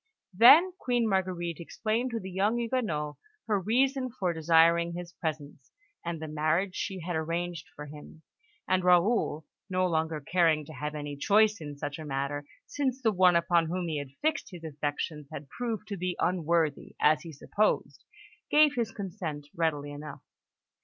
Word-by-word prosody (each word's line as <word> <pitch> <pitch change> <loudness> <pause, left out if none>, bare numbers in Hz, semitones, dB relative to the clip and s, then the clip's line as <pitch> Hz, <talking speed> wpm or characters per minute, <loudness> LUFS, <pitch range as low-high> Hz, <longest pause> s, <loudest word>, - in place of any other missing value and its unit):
Then 290 - +8
Queen 245 -2 +1
Marguerite 180 -4 -1
explained 220 +8 -2
to 230 -2 -3
the 190 -1 -8
young 200 +5 +1
Huguenot 220 - -2 0.3
her 210 -2 +1
reason 255 +6 +1
for 190 -8 -2
desiring 165 +1 +4
his 175 0 -7
presence, 150 -4 -6 0.3
and 170 -1 -4
the 160 - -5
marriage 155 +5 0
she 190 -2 -4
had 175 +1 -3
arranged 170 +2 -3
for 150 - -7
him; 150 +2 -12 0.4
and 185 -1 +2
Raoul, 180 -3 +3 0.2
no 185 0 +1
longer 160 -2 0
caring 160 0 +2
to 155 - -11
have 150 +2 -5
any 145 -1 -5
choice 210 +5 +3
in 145 -2 -7
such 145 +2 -5
a 155 - -7
matter, 140 +1 -3 0.2
since 265 -3 -2
the 225 -4 +2
one 180 -2 +5
upon 170 -1 +3
whom 175 +1 -2
he 155 -2 -1
had 145 -2 -6
fixed 315 +1 0
his 175 -3 -11
affections 150 0 -4
had 140 -1 -8
proved 225 - -4
to 200 - -4
be 180 0 -2
unworthy, 170 -4 0
as 150 0 +4
he 165 - -9
supposed, 205 +8 -1 0.5
gave 300 -1 +5
his 235 -4 -1
consent 165 -8 -6
readily 150 -3 -1
enough. 145 +1 -9
170 Hz, 165 wpm, -29 LUFS, 155-205 Hz, 0.5 s, Then